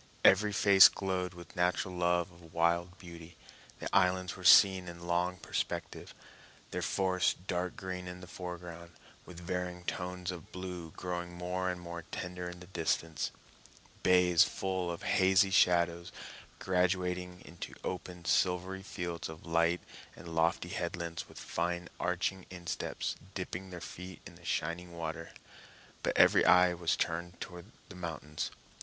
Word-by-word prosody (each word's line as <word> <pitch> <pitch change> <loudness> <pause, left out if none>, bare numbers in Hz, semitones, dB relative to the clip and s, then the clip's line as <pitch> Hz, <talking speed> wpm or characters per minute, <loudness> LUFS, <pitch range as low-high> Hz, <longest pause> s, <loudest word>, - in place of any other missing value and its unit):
Every 105 +3 +6
face 100 -1 +8
glowed 95 -2 -2
with 85 -2 -12
natural 90 +1 +1
love 90 +1 +1
of 85 -2 -16
wild 85 +2 +1
beauty. 85 -2 -11 0.4
The - - -5
islands 90 -1 +3
were - - -11
seen 95 -2 +7
in 85 0 -8
long 90 +1 +1
perspective, - - -4 0.6
their - - -2
forests 95 -2 +1
dark 90 -1 -2
green 90 -1 -5
in 90 0 -7
the 90 - -9
foreground, 85 -1 -8 0.3
with 90 -2 -9
varying 90 0 -3
tones 90 0 -3
of 85 -4 -9
blue 90 -3 -6
growing 90 -1 -4
more 90 +1 -2
and 90 -1 -3
more 85 -1 -6
tender 90 +2 -5
in 90 0 -10
the - - -9
distance; 80 -3 -1 0.7
bays 90 -2 +6
full 95 -2 -2
of 85 - -5
hazy 95 +1 +4
shadows, 85 -2 +3 0.5
graduating 90 -1 0
into 85 - -8
open, 90 -1 -5
silvery 90 +2 +1
fields 85 -4 -5
of 80 0 -10
light, 85 +1 +2 0.3
and 85 - -10
lofty 85 +1 +1
headlands 85 -2 -4
with - - -14
fine 85 0 -2
arching 90 +1 -1
insteps 85 -2 -3 0.2
dipping 95 0 -4
their 90 -1 -7
feet 90 +1 -8
in 95 - -10
the 85 0 -16
shining 85 +1 -2
water. 80 0 -4 0.7
But - - 0
every - - +7
eye 90 0 +6
was 85 -2 +1
turned 85 +1 -2
to 90 -2 -7 0.3
the 95 - -10
mountains. 80 -3 -4
90 Hz, 145 wpm, -32 LUFS, 85-90 Hz, 0.7 s, face